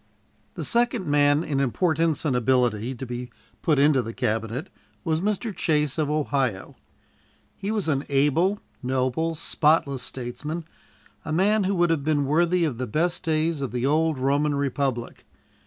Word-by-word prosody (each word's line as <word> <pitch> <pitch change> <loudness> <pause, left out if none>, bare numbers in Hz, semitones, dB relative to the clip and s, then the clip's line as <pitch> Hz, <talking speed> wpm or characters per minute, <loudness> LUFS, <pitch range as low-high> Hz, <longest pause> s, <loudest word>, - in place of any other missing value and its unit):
The - - -4
second 235 -4 +1
man 145 0 +3
in 145 -4 -1
importance 160 +3 +1
and 135 -4 +1
ability 125 -1 +1
to 130 - -6
be 125 0 -6 0.3
put 155 -3 +2
into 140 -1 +4
the 115 -1 -7
Cabinet 115 - -2 0.3
was 160 0 0
Mr. 210 +1 -1
Chase, 150 -2 0
of 150 -2 +1
Ohio. 140 -9 -1 0.8
He 200 - -5
was 215 -5 -1
an 140 -2 0
able, 150 +8 +2 0.2
noble, 130 +6 0
spotless 150 -4 +1
statesman, 135 +7 -5 0.6
a - - -5
man 200 +5 +3
who 195 +1 +1
would 175 -1 +3
have 155 -4 0
been 145 -1 +1
worthy 170 +4 +2
of 130 -7 -3
the 130 - -2
best 170 +9 0
days 160 -1 0
of 135 - -3
the 125 +1 -1
old 155 +1 +2
Roman 140 +3 +1
republic. 135 -3 -2
145 Hz, 155 wpm, -25 LUFS, 130-165 Hz, 0.8 s, into